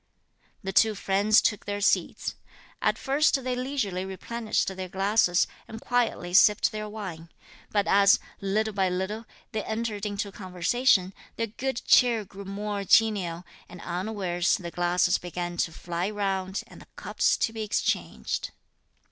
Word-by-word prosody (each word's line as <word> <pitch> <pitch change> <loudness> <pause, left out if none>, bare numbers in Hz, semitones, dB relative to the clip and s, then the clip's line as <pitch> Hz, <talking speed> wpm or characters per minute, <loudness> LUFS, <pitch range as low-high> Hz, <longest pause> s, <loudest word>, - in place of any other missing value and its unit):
The 195 0 -4
two 220 +2 +4
friends 200 +2 +3
took 210 - 0
their 205 0 -3
seats. 205 - +1 0.5
At - - +2
first 275 0 +2
they 255 0 -1
leisurely 250 -8 -2
replenished 215 +4 -2
their 185 -1 -5
glasses, 195 -1 +2 0.2
and 225 - -8
quietly 235 -8 -1
sipped 210 +3 +5
their 215 -1 -5
wine; 185 -6 -7 0.4
but 205 -1 +1
as, 200 0 +6 0.2
little 215 +2 0
by 190 -2 +1
little, 190 +5 -3 0.2
they 215 -2 -2
entered 220 -2 -3
into 205 0 -3
conversation, 185 +2 +1 0.2
their 230 - -1
good 255 +4 -4
cheer 235 -4 +4
grew 195 +1 -10
more 200 +1 -3
genial, 195 -5 +3 0.3
and 180 - -11
unawares 180 -1 -1
the 175 -3 -7
glasses 175 +1 +2
began 175 0 -5
to 165 - 0
fly 175 +3 -3
round, 195 -2 -2
and - - -14
the - - -15
cups - - +1
to 225 - 0
be 220 - -5
exchanged. 210 -1 -1
200 Hz, 150 wpm, -27 LUFS, 185-220 Hz, 0.5 s, as